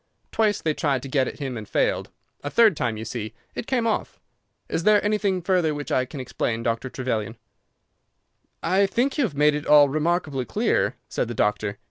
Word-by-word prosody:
Twice 215 -2 +1
they 155 - +1
tried 140 -4 0
to - - -5
get 130 0 +1
at - - -6
him 135 -4 -4
and 110 -3 -7
failed; - - 0 0.3
a 145 - -3
third 220 +1 +5
time, 120 -5 -1
you 110 - -6
see, 110 -1 -5 0.2
it - - -6
came 250 -3 +1
off. 225 - -2 0.5
Is - - -1
there 210 +3 +4
anything 205 -4 0
further 175 -4 +1
which 145 0 -6
I 130 - +2
can 135 +2 -9
explain, 115 -2 -2
Dr. 115 +3 -1
Trevelyan?" 115 -4 -3 1.3
"I 195 +2 +3
think 255 +8 0
you 280 - +4
have 170 -10 -5
made 150 +1 +4
it 150 0 -4
all 145 -1 +7
remarkably 155 -3 0
clear," - - 0
said - - -2
the 120 - -5
doctor. 105 -1 0
145 Hz, 195 wpm, -24 LUFS, 125-190 Hz, 1.3 s, all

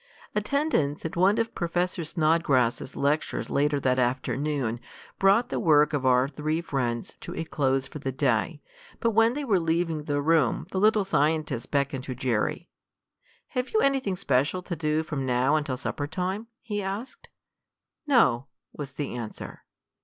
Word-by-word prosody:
Attendance 210 - 0
at 160 - -4
one 190 +5 +4
of 230 0 -1
Professor 175 0 -1
Snodgrass's 155 -7 +1
lectures 145 +2 -1
later 145 0 +2
that 130 -1 +1
afternoon 130 0 -1 0.4
brought 200 +6 +4
the - - -2
work 150 -2 +4
of 135 -3 0
our 125 +1 +4
three 155 +3 -2
friends 125 -8 -2
to - - -7
a 165 - -2
close 135 -4 0
for 150 - -8
the 135 -1 -3
day, 135 +3 0 0.4
but 230 - +1
when 225 +3 +4
they 295 - -2
were 200 -7 +3
leaving 165 -2 -1
the 145 -2 0
room 150 -4 +2
the 190 - -1
little 215 0 +4
scientist 150 -7 0
beckoned 140 -2 0
to 130 - -5
Jerry. 130 +7 -1 0.8
"Have 250 -1 -2
you - - +5
anything 265 -8 +1
special 155 0 0
to 180 - -4
do 155 0 0
from 150 -3 -3
now 130 +3 +2
until 145 -4 -1
supper 145 +2 -3
time?" 190 +7 -3 0.2
he 210 -3 -3
asked. 200 +7 -6 0.8
"No," 135 - +3 0.3
was 140 -2 -7
the 145 0 -4
answer. 115 -3 -7
150 Hz, 160 wpm, -27 LUFS, 135-185 Hz, 0.8 s, you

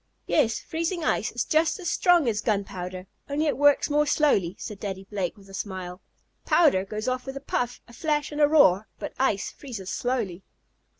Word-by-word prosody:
"Yes, 230 -7 +2
freezing 335 +1 -3
ice - - 0
is - - -2
just 315 0 +2
as 360 - -5
strong 350 -6 +4
as 220 -2 0
gunpowder, 185 -3 -3 0.2
only 295 +2 0
it 295 - +1
works 290 0 +4
more 295 0 +2
slowly," 205 - +2
said 210 -4 -7
Daddy 195 -2 -5
Blake 195 -1 -3
with 195 -1 -17
a 195 - -14
smile. 185 -2 -5 0.4
"Powder 290 - +4
goes 215 +3 -5
off 255 +1 -2
with 270 0 -5
a - - -4
puff, 245 -3 -2
a 235 - -15
flash 300 +2 -1
and 295 0 -2
a 295 - +7
roar, 220 - +5
but - - -6
ice 235 -7 +1
freezes 225 -9 -7
slowly." 225 -8 -2
240 Hz, 190 wpm, -26 LUFS, 195-295 Hz, 0.4 s, a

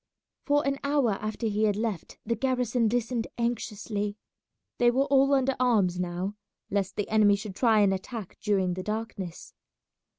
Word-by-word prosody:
For 290 0 +2
an 275 0 0
hour 280 -5 +2
after 215 +3 -3
he 215 0 +1
had 205 -2 +2
left 215 -5 -3
the 230 - 0
garrison 245 -2 +1
listened 235 0 -1
anxiously. 210 -3 -2 0.6
They 240 - +5
were 265 +3 +2
all 275 0 +4
under 270 -1 +2
arms 205 -8 +2
now, 180 +3 -3 0.3
lest 195 -1 -1
the 205 - -2
enemy 210 -2 +4
should 200 0 -6
try 225 -2 +4
and 195 -1 +4
attack 195 +1 -6
during 190 -4 +1
the 185 - -4
darkness. 210 -4 -5
220 Hz, 160 wpm, -28 LUFS, 200-245 Hz, 0.6 s, They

